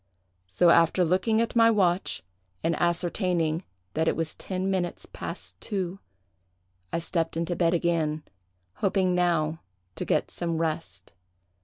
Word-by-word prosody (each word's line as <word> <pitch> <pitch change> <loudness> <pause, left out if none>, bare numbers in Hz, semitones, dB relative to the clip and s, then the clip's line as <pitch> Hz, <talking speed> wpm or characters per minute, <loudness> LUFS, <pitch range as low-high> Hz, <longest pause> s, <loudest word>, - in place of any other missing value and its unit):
So, 170 - +4
after 170 +2 +4
looking 190 +6 +2
at 230 - -1
my 230 -1 +7
watch, 190 -4 +1 0.4
and 165 0 +2
ascertaining 170 -1 +1 0.3
that 160 +1 +1
it - - +2
was 165 -1 -2
ten 190 0 -3
minutes 180 -2 -2
past - - -7
two, 190 -3 -3 0.9
I - - 0
stepped 165 -1 -1
into 170 +1 -1
bed 170 0 +2
again, 160 -3 0 0.5
hoping 190 -2 +2
now 165 -3 +1 0.4
to - - -2
get - - 0
some 170 -1 -2
rest. 155 - -3
170 Hz, 135 wpm, -27 LUFS, 165-185 Hz, 0.9 s, my